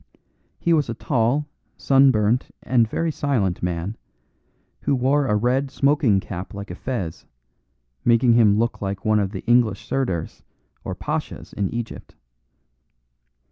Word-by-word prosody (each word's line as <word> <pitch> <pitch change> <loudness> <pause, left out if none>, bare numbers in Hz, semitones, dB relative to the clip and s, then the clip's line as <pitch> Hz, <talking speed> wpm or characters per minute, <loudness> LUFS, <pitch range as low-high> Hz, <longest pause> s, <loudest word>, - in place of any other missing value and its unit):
He 170 - +1
was 150 -6 +2
a 115 - -3
tall, 130 +4 0 0.3
sunburnt, 130 -4 +3 0.2
and 120 -3 +3
very 165 +6 -1
silent 120 -12 -1
man, 90 +5 -3 0.8
who 140 - +1
wore 135 +3 +2
a 105 - +2
red 125 +5 +1
smoking 140 -8 +2
cap 95 0 -7
like 100 -1 -7
a - - -6
fez, 95 -9 -5 0.8
making 120 0 +4
him 110 -3 +5
look 115 +1 -1
like 100 -1 -4
one 110 0 +3
of 100 -2 0
the 95 -2 -7
English 120 -4 +2
Sirdars 95 -12 -2 0.4
or - - -4
Pashas - - -5
in 100 -2 -1
Egypt. 120 -1 -6
115 Hz, 140 wpm, -22 LUFS, 100-135 Hz, 0.8 s, him